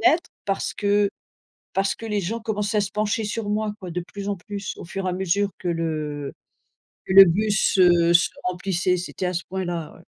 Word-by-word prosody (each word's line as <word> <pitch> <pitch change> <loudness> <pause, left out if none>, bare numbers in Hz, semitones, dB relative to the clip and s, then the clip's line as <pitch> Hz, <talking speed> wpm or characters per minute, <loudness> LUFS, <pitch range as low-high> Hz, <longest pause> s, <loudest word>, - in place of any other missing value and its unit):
fenêtre. 330 +2 -1
Parce 195 -1 -1
que 205 0 +2 0.6
parce 195 0 +1
que - - -11
les 210 -1 0
gens 220 +6 -3
commençaient 210 -1 -2
à - - +4
se 195 - -3
pencher 210 +1 -1
sur 210 0 -3
moi 210 0 0
quoi, 180 -2 -7
de 175 +1 -3
plus 200 0 -5
en 200 - -1
plus 200 +2 -6
au - - -9
fur 185 +2 -4
et - - +1
à - - -3
mesure 190 +2 +1
que 180 - -4
le, 155 -4 -2 0.7
que 190 - -2
le 195 0 +12
bus, 200 +3 +2
heu, 175 -2 +5
se 175 +1 +5
remplissait. 180 0 0
C'était 180 +1 -4
à 180 - -2
ce 175 - -1
point-là 175 -4 -4
ouais. - - -17
195 Hz, 210 wpm, -24 LUFS, 175-205 Hz, 0.7 s, le